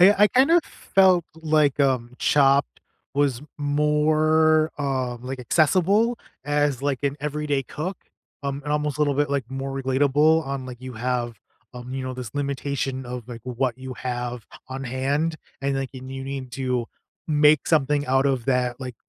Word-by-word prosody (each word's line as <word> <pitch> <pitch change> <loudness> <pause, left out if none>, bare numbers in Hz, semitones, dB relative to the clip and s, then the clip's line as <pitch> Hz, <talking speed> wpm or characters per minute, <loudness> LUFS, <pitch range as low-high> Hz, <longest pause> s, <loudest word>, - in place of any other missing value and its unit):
I 195 +3 +8
I - - +7
kind 260 +4 +4
of 340 -1 +5
felt 185 -3 +3
like, 155 -3 +2
um, 125 -3 +1
Chopped 140 -1 +3 0.3
was 140 -3 +1 0.2
more, 155 +2 +3
uh, 130 -3 -1
like, 130 +2 -6
accessible 185 - +2 0.3
as, 145 -2 +1
like, 140 -2 0
an 140 0 0
everyday 150 -1 -1
cook, 175 +9 -5 0.5
um, 140 0 -3
and 150 - -2
almost 150 -2 -1
a - - -3
little 145 -2 +2
bit 145 0 +1
like 140 -4 -1
more 135 0 -4
relatable 145 +4 +3
on, 135 -1 -4
like, 125 -1 -9
you 130 -1 -8
have, 120 0 -2 0.4
um, 125 +1 -8
you 135 - -3
know, 130 0 -4
this 125 -4 -7
limitation 140 -2 -2
of, 125 -1 -7
like, 120 -1 -7
what 125 0 -1
you 130 0 -7
have 125 -2 -4 0.2
on 135 +1 -5
hand, 140 +6 -1 0.2
and, 140 0 0
like, 135 -1 -3
and 130 0 -8
you 135 0 -6
need 135 -2 -6
to 125 -2 -1 0.4
make 150 -2 +4
something 145 -2 +2
out 135 +1 +3
of 130 -4 0
that, 125 -1 0
like, 130 -2 -6
140 Hz, 175 wpm, -24 LUFS, 130-150 Hz, 0.5 s, I